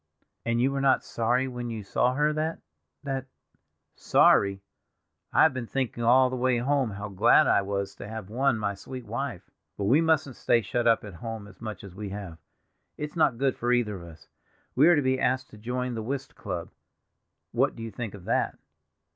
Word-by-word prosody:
"And 115 0 +1
you 130 +3 +3
were 140 0 -1
not 135 -1 +3
sorry 120 +3 0
when 120 -2 -5
you 110 -2 -5
saw 125 +5 +1
her, 150 +2 +2
that—that—" 135 - -5 0.7
"Sorry! 100 0 +3 0.7
I - - +5
have 160 - +5
been 125 -3 -4
thinking 130 -2 -2
all 125 +2 +5
the - - -2
way 125 0 +2
home 135 0 +1
how 100 0 -6
glad 100 -2 +5
I - - +4
was 100 0 -3
to - - -8
have 110 -3 -6
won 125 +3 +1
my 105 -2 -1
sweet 125 +5 -9
wife. - - -5 0.3
But 100 - -3
we 130 +11 +4
mustn't 155 -5 +1
stay 115 - +3
shut 120 +4 0
up 115 - +4
at 105 -2 -8
home 110 +4 -6
as 105 - -17
much 110 -1 -6
as 100 -3 -10
we 100 +1 -6
have; 95 -5 -7 0.6
it's 150 +1 -5
not 145 -7 +3
good 135 +1 +1
for 120 +1 -1
either 120 -4 +1
of - - -10
us. 80 0 -16 0.5
We 140 +6 +6
are 175 - +7
to 145 - +1
be 130 0 +1
asked 130 +1 0
to 110 - -12
join 125 +2 -3
the 115 - -3
whist 135 +4 -4
club—what - - -5
do 115 - -7
you 115 - -5
think 105 0 -5
of 95 -3 -13
that? - - 0
120 Hz, 200 wpm, -27 LUFS, 105-130 Hz, 0.7 s, are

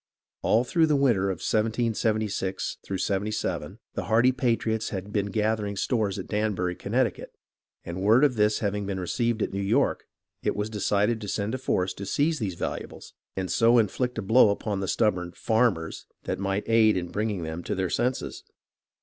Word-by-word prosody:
All 115 +3 +3
through 160 +5 +2
the 150 - +3
winter 120 -9 +3
of 95 -3 -4
1776 110 -3 0
77 100 +2 -2 0.2
the - - -3
hardy 120 +3 +4
patriots 115 -3 0
had 100 +1 -6
been 100 -1 +1
gather 110 +1 0
ing 100 0 -3
stores 105 -1 0
at 95 - -5
Danbury, 105 -4 -1
Connecticut, 115 +7 -1 0.5
and 85 +2 -5
word 110 +7 +5
of 145 -3 +4
this 105 -2 +2
hav 100 -2 0
ing 105 -1 -3
been 95 -1 -2
received 115 +5 0
at - - -3
New 100 - -2
York 115 +8 +1 0.4
it - - 0
was 105 +1 -2
decided 105 +2 +1
to 105 - -6
send 100 +2 -2
a 130 - -2
force 95 -7 0
to 100 +1 -7
seize 155 - +1
these 100 -6 -2
valuables - - -6 0.2
and 95 -1 -2
so 115 +1 +5
inflict 125 +2 0
a 110 - -2
blow 110 +3 +6
upon 100 0 -2
the 95 - -2
stubborn 90 -6 0
"farmers" 110 -8 0 0.2
that - - -3
might 100 +1 -2
aid 110 -3 +4
in 90 -1 -3
bringing 105 -4 -2
them 80 +1 -4
to 105 - -3
their 95 -2 -1
senses. 125 +2 -1
105 Hz, 185 wpm, -26 LUFS, 95-115 Hz, 0.5 s, blow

